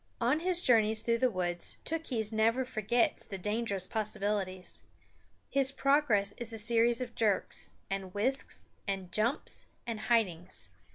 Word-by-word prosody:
On 250 +6 +2
his 355 +1 +5
journeys 220 -2 +4
through 230 0 +1
the 255 - +3
woods 175 -4 -1
Tookhees 260 -10 -2
never 225 +4 +2
forgets 235 0 0
the 195 - -5
dangerous 210 -1 -1
possibilities. 200 -3 -2 0.7
His 270 -1 +3
progress 275 -9 +2
is 235 -1 -3
a 225 - -3
series 230 +2 +3
of 245 -2 -5
jerks, 210 -4 0
and 195 -1 -4
whisks, 245 +8 -2 0.2
and 190 -2 -3
jumps, 225 +5 0 0.2
and 230 -2 -4
hidings. 190 - 0
220 Hz, 135 wpm, -31 LUFS, 200-245 Hz, 0.7 s, his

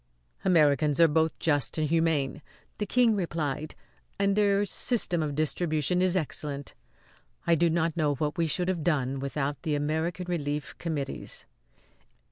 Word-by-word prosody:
"Americans 150 -5 +3
are 165 - +8
both 160 +1 +1
just 145 -6 0
and 155 -1 +1
humane," 160 -3 +1 0.4
the 210 - -1
King 240 -3 +4
replied; 155 -5 -3 0.4
"and 200 0 +2
their 205 -1 +3
system 200 -5 -1
of 150 -2 -2
distribution 155 +2 0
is 185 0 +2
excellent. 145 -3 -3 0.7
I 170 - +4
do 170 +1 +3
not 165 -1 0
know 150 -3 +1
what 150 +2 -2
we 165 -1 +1
should 180 +3 -1
have 180 -4 -1
done 135 -5 0
without 140 +1 -3
the 155 -2 -1
American 160 +5 -1
Relief 150 -4 -3
Committees." 150 -5 -4
160 Hz, 145 wpm, -28 LUFS, 145-175 Hz, 0.7 s, are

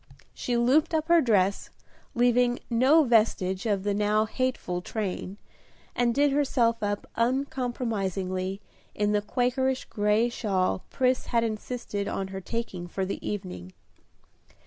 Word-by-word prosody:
She 245 -1 -2
looped 280 +8 +3
up 315 +1 -1
her 340 -1 +6
dress, 200 -6 +1 0.5
leaving 245 0 +3
no 265 +7 +5
vestige 215 -5 +2
of 200 -3 0
the 205 0 0
now 210 +1 +2
hateful 220 -7 -2
train, 195 -1 -4 0.6
and 245 -1 +2
did 285 0 +3
herself 255 -5 +1
up 205 -1 -2
uncompromisingly 220 -7 -1 0.3
in 210 0 +1
the 210 0 +2
Quakerish 255 +4 0
gray 210 +2 +2
shawl 195 -6 -1
Pris 255 -1 +1
had 235 -1 +1
insisted 215 -2 -3
on 195 -1 -3
her 190 0 -6
taking 190 -4 -4
for 190 +2 -3
the 190 - -4
evening. 180 - -5
225 Hz, 130 wpm, -27 LUFS, 195-250 Hz, 0.6 s, her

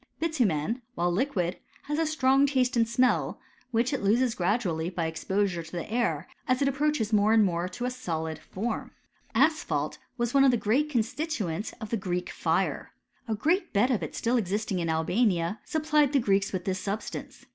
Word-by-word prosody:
Bitumen, 240 - 0
while 175 +1 +1
liquid, 185 -4 -1 0.2
has 295 +2 -2
a 325 - +2
strong 275 -2 +3
taste 255 -3 +1
and 230 -1 +2
smell, 250 +2 +2 0.3
which 240 +3 +1
it 275 - -1
loses 230 +4 +3
gradually 175 -4 0
by 175 -2 -2
exposure 180 +2 -1
to 165 0 -11
the 175 +4 -5
air, 175 -10 0 0.2
as 255 0 +2
it 280 - +2
approaches 275 -5 0
more 210 +1 +4
and 220 -2 +6
more 175 -1 -1
to 240 +7 -5
a 250 - -1
solid 160 -9 -4
form. 220 +8 -4 0.4
Asphalt 310 0 +1 0.2
was 240 0 -1
one 275 -1 +6
of 275 - +6
the 245 - +3
great 250 +8 +1
constituents 235 - -2
of 220 - -7
the 230 - +1
Greek 180 -2 -3
fire. - - -1 0.3
A 220 - 0
great 330 - 0
bed 235 +6 +3
of 235 - +1
it - - -5
still 240 +1 +1
existing 205 -2 -1
in 165 -1 -1
Albania, 175 +3 +1
supplied 300 -2 +2
the 280 - +5
Greeks 200 -4 +1
with 185 -2 -3
this 190 -1 -1
substance. 205 +3 -5
220 Hz, 185 wpm, -28 LUFS, 180-260 Hz, 0.4 s, and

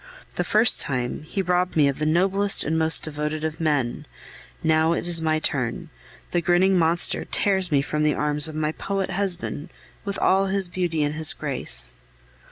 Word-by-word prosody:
The - - -2
first - - +3
time, 125 -2 -2
he 190 +6 -4
robbed 180 0 0
me 150 -3 +4
of 140 - -2
the 155 - 0
noblest 195 +5 +2
and 160 - -1
most 160 0 +1
devoted 150 0 -4
of 160 0 -4
men; 145 -6 -1 0.6
now 160 +1 +2
it 175 - -3
is 170 -2 +3
my 155 -1 +1
turn, 130 -6 -3 0.4
the 175 - 0
grinning 180 +3 +3
monster 170 0 +2
tears 190 -3 0
me 140 -2 +2
from 150 +1 -3
the 150 -1 +2
arms 150 +1 +1
of 155 - -8
my 155 0 -1
poet 195 +3 -3
husband, 180 -5 -2 0.3
with 200 -1 -4
all 195 +1 +2
his 195 -1 +1
beauty 175 -4 -1
and 145 0 -1
his 155 0 +3
grace. - - -3
160 Hz, 180 wpm, -23 LUFS, 150-180 Hz, 0.6 s, me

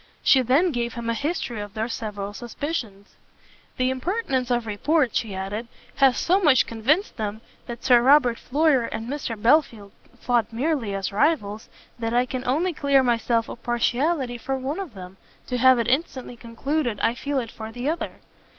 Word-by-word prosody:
She 265 - +6
then 280 +9 +3
gave 235 -3 -2
him 230 -1 -2
a - - 0
history 245 -5 -3
of 205 +1 -8
their 220 +1 -1
several 205 -4 -5
suspicions. 230 -4 -6 0.6
"The 255 0 +1
impertinence 265 - -1
of 240 -2 0
report," 250 +5 +1
she 210 -4 -1
added, 200 +5 -4 0.3
"has 270 -2 +4
so 370 +3 +2
much 295 -9 +4
convinced 270 - 0
them 215 0 -4 0.3
that 235 0 -7
Sir 245 -2 +6
Robert 250 -2 +4
Floyer 285 -3 +2
and 225 0 -5
Mr 255 -5 -4
Belfield 230 -5 +2 0.3
fought 240 -3 0
merely 240 -4 -1
as 195 0 -3
rivals, 210 -3 0 0.3
that 230 0 -2
I 245 +1 +3
can 255 0 -5
only 330 +8 +1
clear 280 -3 +3
myself 230 -1 +1
of - - -9
partiality 245 +2 0
for 270 +3 -2
one 270 +6 -3
of 345 - -7
them, 185 0 -10 0.3
to 250 - -2
have 260 +1 +6
it 235 -1 0
instantly 260 -2 -1
concluded 240 0 -2
I 230 - +2
feel 280 +3 -3
it 235 -4 -2
for 220 0 -8
the 245 +3 -5
other. 325 +3 -3
245 Hz, 180 wpm, -24 LUFS, 225-280 Hz, 0.6 s, She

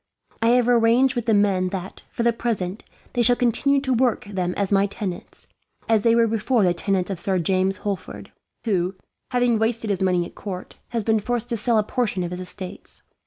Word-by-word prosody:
I 225 - +3
have 245 0 +4
arranged 245 +2 +4
with 240 -1 -3
the 225 - +4
men 195 -3 +2
that, 190 0 -6
for 235 - -3
the 235 0 +3
present, 215 -4 -3 0.3
they 245 - +1
shall 245 +1 +5
continue 265 +4 +2
to 260 -2 0
work 245 -2 +1
them 185 -3 -2
as 200 -1 -1
my 200 0 +4
tenants, 195 -2 -6 0.4
as 225 -2 +3
they 230 +2 +4
were 235 0 +5
before 225 +1 +1
the 180 -2 +3
tenants 190 +1 -1
of 185 - -4
Sir 190 +2 0
James 185 +2 +1
Holford; 200 -2 -5 0.3
who, 190 -3 0 0.3
having 245 -3 +2
wasted 225 -1 0
his 190 - -1
money 180 -2 +2
at - - -11
court, 185 -3 -7
has 230 -2 -2
been 220 +1 +2
forced 240 +2 -2
to 235 - 0
sell 225 +2 +2
a 215 - +3
portion 210 -5 -1
of 175 - -4
his 180 - -5
estates. 185 0 -7
210 Hz, 210 wpm, -23 LUFS, 190-235 Hz, 0.4 s, shall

